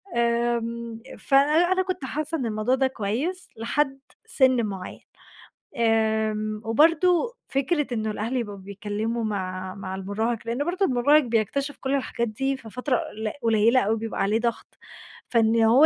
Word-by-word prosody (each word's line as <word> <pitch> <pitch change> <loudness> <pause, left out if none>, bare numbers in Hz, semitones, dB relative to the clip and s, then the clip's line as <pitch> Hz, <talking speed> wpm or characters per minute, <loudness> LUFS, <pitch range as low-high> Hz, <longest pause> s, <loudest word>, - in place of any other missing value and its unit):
آمم، 235 -1 0 0.2
فأنا 300 +6 +4
أنا 375 0 +3
كنت 370 -7 -4
حاسة 305 +4 -2
إن 255 - -2
الموضوع 220 +3 +1
ده 265 0 +2
كويس 260 - -3
لحد 270 +4 0 0.3
سن 255 -4 +3
مُعيّن، 190 -3 -6 0.8
آمم، 220 -1 +1
وبرضو 335 - +3
فكرة 290 +2 0
إن 220 -1 -2
الأهل 215 +4 -2
يبقوا 205 -4 -3
بيتكلموا 205 +4 -3
مع 185 -2 -3
مع 190 -1 -5
المراهق، 210 +4 -2
لأن 240 +5 -1
برضو 370 +3 +1
المراهق 285 +3 +4
بيكتشف 245 +5 -1
كل 270 +1 -1
الحاجات 235 -3 -1
دي 270 +5 -1
في 225 -4 -11
فترة 250 +2 0
قل 215 0 -4
قليلة 230 +2 +4
أوي، 220 +3 +1
بيبقى 225 0 -4
عليه 210 +3 +2
ضغط، 235 -1 -3 0.5
فإن 230 -1 +3
هو 250 +7 +6
235 Hz, 150 wpm, -25 LUFS, 215-275 Hz, 0.8 s, هو